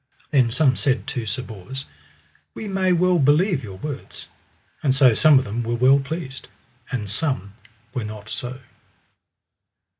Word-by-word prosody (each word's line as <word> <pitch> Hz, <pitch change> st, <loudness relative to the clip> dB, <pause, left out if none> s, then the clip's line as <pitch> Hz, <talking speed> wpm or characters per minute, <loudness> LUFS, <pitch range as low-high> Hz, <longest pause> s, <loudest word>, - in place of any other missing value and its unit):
Then 130 Hz, -5 st, +4 dB
some 130 Hz, +2 st, +3 dB
said 135 Hz, -2 st, +1 dB
to 125 Hz, -6 st, -4 dB
Sir 110 Hz, +5 st, -2 dB
Bors: 125 Hz, +5 st, -7 dB, 0.7 s
We 215 Hz, -, -6 dB
may 190 Hz, -2 st, +1 dB
well 180 Hz, 0 st, +3 dB
believe 150 Hz, +2 st, +3 dB
your 95 Hz, -3 st, -8 dB
words. 140 Hz, +6 st, -7 dB, 0.5 s
And 135 Hz, -3 st, +2 dB
so 130 Hz, -4 st, +6 dB
some 150 Hz, +5 st, +6 dB
of 130 Hz, -, +2 dB
them 110 Hz, +4 st, -3 dB
were 120 Hz, 0 st, -1 dB
well 130 Hz, +3 st, +5 dB
pleased, 140 Hz, -2 st, -5 dB, 0.4 s
and 115 Hz, -6 st, -2 dB
some 105 Hz, -, -2 dB, 0.4 s
were 125 Hz, -4 st, -2 dB
not 105 Hz, 0 st, -8 dB
so. 125 Hz, +4 st, -5 dB
130 Hz, 150 wpm, -23 LUFS, 115-150 Hz, 0.7 s, so